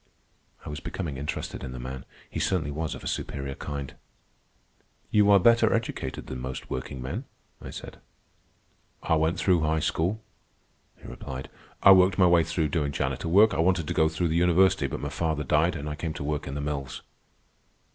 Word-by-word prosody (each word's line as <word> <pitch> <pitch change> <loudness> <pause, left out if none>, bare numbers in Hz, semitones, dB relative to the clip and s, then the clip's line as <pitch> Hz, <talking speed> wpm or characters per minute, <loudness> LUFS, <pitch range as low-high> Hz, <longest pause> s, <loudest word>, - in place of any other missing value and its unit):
I - - -6
was 75 +1 -5
becoming 75 -3 -5
interested 75 +2 -4
in 65 - -6
the 65 - -7
man. 65 +1 -6 0.2
He - - -5
certainly 80 -6 0
was 80 +2 -3
of - - -11
a - - -5
superior 70 -1 -3
kind. 70 -1 -6 1.2
"You 105 -1 +4
are 100 - +8
better 115 +2 +5
educated 115 - -2
than 65 - -6
most 65 0 -6
workingmen," 65 0 -4 0.4
I - - -8
said. - - -9 1.0
"I - - +1
went 80 +2 +2
through 90 -1 +3
high 80 +1 +1
school," 95 +9 -1 0.8
he - - -12
replied. 65 0 -7 0.3
"I 100 - +9
worked 95 0 +6
my 95 - +6
way 85 -1 +5
through 80 -1 -1
doing 75 -2 0
janitor 70 - -2
work. 100 +6 +5
I 75 - -2
wanted 85 -2 +2
to - - -1
go 80 0 +3
through 80 +2 -1
the 80 - 0
university. 90 -3 +4
But - - -5
my 70 - -3
father 80 0 -1
died, 75 +6 +2
and 75 -1 -5
I 75 - -3
came 80 +1 -4
to - - -5
work 75 0 -2
in 70 - -5
the 70 - -3
mills. 70 -3 -4
80 Hz, 190 wpm, -27 LUFS, 70-90 Hz, 1.2 s, I